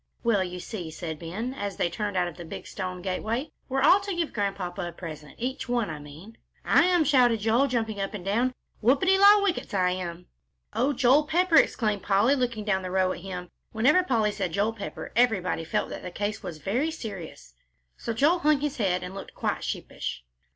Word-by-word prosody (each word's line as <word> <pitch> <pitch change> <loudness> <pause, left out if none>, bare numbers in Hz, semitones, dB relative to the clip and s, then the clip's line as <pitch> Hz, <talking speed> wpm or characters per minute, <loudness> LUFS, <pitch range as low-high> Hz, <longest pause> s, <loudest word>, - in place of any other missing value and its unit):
"Well, 220 -5 +3
you 180 0 -6
see," 180 -3 -6
said 160 -1 -6
Ben, 205 +10 -4
as 205 -6 -4
they - - +2
turned 205 +3 -3
out 180 -1 +2
of 170 - -7
the 175 - -8
big 165 - -8
stone 185 -2 -5
gateway, 220 +9 -2 0.2
"we 265 - -1
are 270 - +2
all 370 +6 +7
to 395 -1 -4
give 335 -2 -2
Grandpapa 195 -3 -2
a - - -5
present, 155 -4 -9
each 260 +1 -4
one, 240 -7 0
I 155 - -6
mean." 155 +10 -12 0.3
"I - - +5
am," 355 -2 +4
shouted 250 -6 +4
Joel, 230 +6 +3
jumping 225 -5 -1
up 195 +2 -3
and 185 -3 -7
down, 240 +6 +1 0.3
"Whoopity 280 - +4
la, 405 +1 +8
whickets, 360 - -1
I 180 -1 +3
am!" 180 -1 -5 0.5
"Oh, 245 +6 +2
Joel 275 +3 +4
Pepper!" 345 +1 +3
exclaimed 210 -4 +2
Polly, 205 +6 +3
looking 240 -6 -1
down 190 -3 +1
the 185 - -5
row 185 0 +2
at - - -5
him. 180 -1 -7 0.2
Whenever 270 +11 +4
Polly 230 -11 +1
said 190 -5 -3
"Joel 205 +3 +1
Pepper," 215 -3 -7
everybody 210 -8 +2
felt 160 - -1
that - - -6
the 180 - -6
case 205 +3 -3
was 175 -6 -6
very 235 - 0
serious. 200 - -8 0.4
So - - -4
Joel 295 +10 +3
hung 300 -3 +3
his 295 -1 -2
head 185 -5 +1
and 180 - -6
looked 195 - -9
quite - - -2
sheepish. 65 - -4
210 Hz, 210 wpm, -27 LUFS, 185-260 Hz, 0.5 s, la